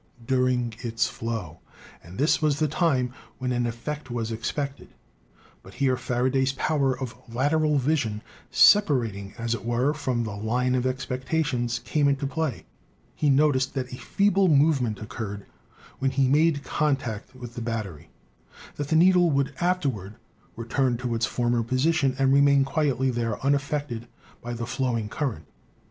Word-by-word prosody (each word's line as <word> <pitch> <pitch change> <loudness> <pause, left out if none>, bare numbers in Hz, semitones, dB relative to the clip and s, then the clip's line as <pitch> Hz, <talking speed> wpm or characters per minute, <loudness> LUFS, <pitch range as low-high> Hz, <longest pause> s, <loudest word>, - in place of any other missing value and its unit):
During 125 -2 +1
its 115 -1 0
flow 110 -9 -5 0.2
— - - -21
and 85 +3 -12
this 150 +5 +2
was 150 -2 +2
the 155 0 +1
time 140 -6 +1 0.2
when 130 -1 -2
an 120 -1 0
effect 130 +4 -5
was 115 -2 -3
expected; 140 +5 -4 0.7
but - - -14
here 135 -2 +2
Faraday's 130 +2 0
power 135 -2 0
of 130 -3 -4 0.2
lateral 150 +4 +2
vision, 130 -7 0 0.3
separating, 115 - +4
as 115 0 -1
it 115 - -4
were, 120 +5 +1
from 130 -5 -1
the 105 -3 -5
line 120 +5 0
of 130 0 +1
ex 130 0 -3
pectation, 125 -3 -1
came 145 -2 +1
into 140 0 +1
play 155 -2 -3 0.2
— - - -36
he 150 - +1
noticed 140 -1 +3
that 125 -2 -3
a - - -6
feeble 195 - +2
move 150 -2 +4
ment 110 -4 -2
occurred 105 -1 -6 0.5
when 135 - +1
he 135 0 +2
made 145 +1 +3
contact 135 -8 -2
with 120 -2 -9
the 120 - -6
battery; 100 -9 -5 0.7
that 145 - -3
the 160 - +1
needle 175 +1 +5
would 140 -2 0
afterward 135 - -1 0.4
return 120 +2 0
to 125 -1 -3
its 115 +1 0
former 120 -1 0
posi 130 +8 +1
tion 135 -5 +1
and 135 -1 +3
remain 140 -1 +5
quietly 135 -2 +1
there 115 -3 -2
unaffected 140 -4 -1 0.3
by 120 - -6
the 115 0 -4
flowing 120 -3 -1
current. 110 - -3
130 Hz, 160 wpm, -26 LUFS, 115-145 Hz, 0.7 s, needle